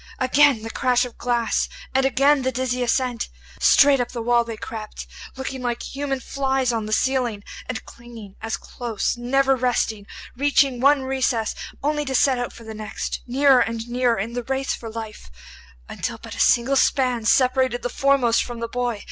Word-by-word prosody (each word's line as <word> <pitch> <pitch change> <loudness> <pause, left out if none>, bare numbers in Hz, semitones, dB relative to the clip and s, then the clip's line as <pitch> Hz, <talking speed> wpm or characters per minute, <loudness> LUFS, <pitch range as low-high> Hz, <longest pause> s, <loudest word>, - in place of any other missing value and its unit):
Again 260 -2 +3
the 225 - -5
crash 250 0 +2
of 245 - -11
glass, 240 -2 0 0.2
and 265 0 +3
again 275 +2 +3
the 260 0 0
dizzy 250 0 -2
ascent. 245 -1 0 0.3
Straight 280 -1 +6
up 245 - -1
the 235 - -4
wall 240 0 +3
they 230 -1 -7
crept, 215 -1 -7 0.3
looking 265 0 -5
like 240 -1 -2
human 275 -1 -3
flies 265 -1 -1
on 220 -2 -2
the - - -6
ceiling, 245 -3 0 0.3
and 255 - -4
clinging 230 -4 -12
as 225 0 -3
close, 235 -4 -3
never 270 +3 +2
resting, 230 -5 -1 0.3
reaching 275 -1 +2
one 280 0 +4
recess 260 -4 0 0.3
only 295 +1 0
to 265 -1 -2
set 260 -1 +3
out 245 - -3
for 235 - -13
the 220 0 -8
next; 215 -1 -5
nearer 270 +1 +4
and 230 -1 -1
nearer 245 -1 +1
in 220 +4 -3
the 245 - -2
race 265 +2 -2
for 230 - -7
life, 220 - -8 0.6
until - - -4
but - - -10
a - - -8
single 245 +3 +3
span 255 -3 +2
separated 255 0 +2
the - - 0
foremost 255 -2 +2
from 240 -1 -7
the 230 - -3
boy. 240 -2 -2
245 Hz, 180 wpm, -22 LUFS, 230-265 Hz, 0.6 s, Straight